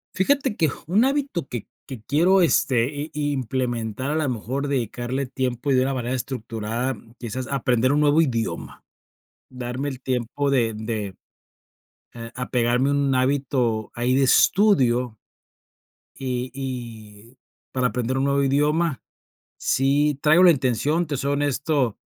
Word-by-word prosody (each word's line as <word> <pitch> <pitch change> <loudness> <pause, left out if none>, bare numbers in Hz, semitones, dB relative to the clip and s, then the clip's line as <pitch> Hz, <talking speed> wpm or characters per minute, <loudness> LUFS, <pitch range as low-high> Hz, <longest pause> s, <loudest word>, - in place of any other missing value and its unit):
Fíjate 265 +2 +1
que 160 - +3
ju - - -5
un 215 +7 +4
hábito 270 - -1
que 120 -4 -6 0.2
que 130 -6 -8
quiero, 175 +9 +3
este, 130 -8 +3 0.3
i 145 -1 -1
implementar, 125 0 -2
a - - -1
lo 155 -4 0
mejor 130 +5 -3
dedicarle 125 +1 -2
tiempo 130 +1 -2
y - - +4
de 130 - +4
una 135 +1 0
manera 125 0 -2
estructurada, 120 0 -3 0.2
quizás 125 +2 -5
aprender 130 -2 +1
un 145 - +2
nuevo 150 +2 +4
idioma, 115 - -3 0.6
darme 125 +2 -4
el 130 -2 -7
tiempo 130 +2 -1
de 115 -5 +1
de, 110 -3 -4 1.0
eh, 115 0 -8
apegarme 125 +1 +1
a - - +1
un 140 -2 +1
hábito 130 -4 0
ahí 120 +2 0
de 135 - +3
estudio 125 - +3 1.0
y 125 -1 -3
y 120 -3 -8 0.3
para 130 -1 +1
aprender 125 +3 -2
un 135 - +1
nuevo 140 0 +2
idioma, 150 +2 +1 0.6
sí 140 +2 +1
traigo 155 +4 +5
la 180 - +9
intención, 145 +4 +1
te 145 - -3
soy 140 +2 -1
honesto, 145 -4 0
130 Hz, 145 wpm, -23 LUFS, 120-145 Hz, 1.0 s, la